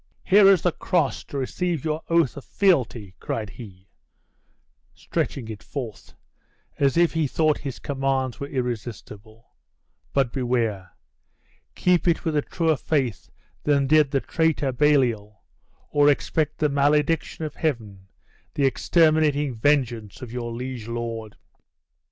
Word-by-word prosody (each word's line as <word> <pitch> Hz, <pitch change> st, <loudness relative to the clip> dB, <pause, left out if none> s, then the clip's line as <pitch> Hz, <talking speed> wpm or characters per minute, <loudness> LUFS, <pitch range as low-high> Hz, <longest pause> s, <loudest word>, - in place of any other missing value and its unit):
Here 200 Hz, 0 st, +6 dB
is 195 Hz, -4 st, +5 dB
the 180 Hz, -, +3 dB
cross, 165 Hz, -5 st, -1 dB
to 140 Hz, -, -6 dB
receive 165 Hz, +3 st, -2 dB
your 155 Hz, 0 st, -1 dB
oath 165 Hz, -5 st, +2 dB
of 140 Hz, -, -8 dB
fealty," 125 Hz, -, +1 dB
cried 110 Hz, -3 st, -4 dB
he, 95 Hz, -5 st, -12 dB, 1.1 s
stretching 125 Hz, -5 st, -3 dB
it 110 Hz, -1 st, -7 dB
forth, 120 Hz, -4 st, -7 dB, 0.6 s
as 140 Hz, +1 st, +2 dB
if 170 Hz, -1 st, +4 dB
he 160 Hz, -2 st, +1 dB
thought 155 Hz, +2 st, +1 dB
his 135 Hz, -3 st, -6 dB
commands 135 Hz, -2 st, -2 dB
were 140 Hz, -, -4 dB
irrestible; 115 Hz, -3 st, -6 dB, 0.7 s
"but 135 Hz, -4 st, +1 dB
beware! 115 Hz, -8 st, -1 dB, 0.8 s
keep 180 Hz, -1 st, +2 dB
it 170 Hz, -, +1 dB
with 160 Hz, -2 st, 0 dB
a 145 Hz, -, +3 dB
truer 160 Hz, 0 st, 0 dB
faith 130 Hz, -, -1 dB, 0.3 s
than 140 Hz, -2 st, +2 dB
did 150 Hz, 0 st, +4 dB
the 135 Hz, -1 st, 0 dB
traitor 160 Hz, -4 st, 0 dB
Baliol, 120 Hz, -7 st, +1 dB, 0.5 s
or 145 Hz, 0 st, +5 dB
expect 150 Hz, +1 st, 0 dB
the 150 Hz, -, +2 dB
malediction 150 Hz, +3 st, +1 dB
of 150 Hz, -, -5 dB
Heaven, 110 Hz, -, -3 dB, 0.5 s
the 140 Hz, -, +2 dB
exterminating 150 Hz, -1 st, +2 dB
vengeance 120 Hz, -5 st, 0 dB
of 120 Hz, -, -8 dB
your 120 Hz, -1 st, -4 dB
liege 125 Hz, -1 st, -6 dB
lord!" 115 Hz, -2 st, -5 dB
135 Hz, 135 wpm, -24 LUFS, 115-155 Hz, 1.1 s, Here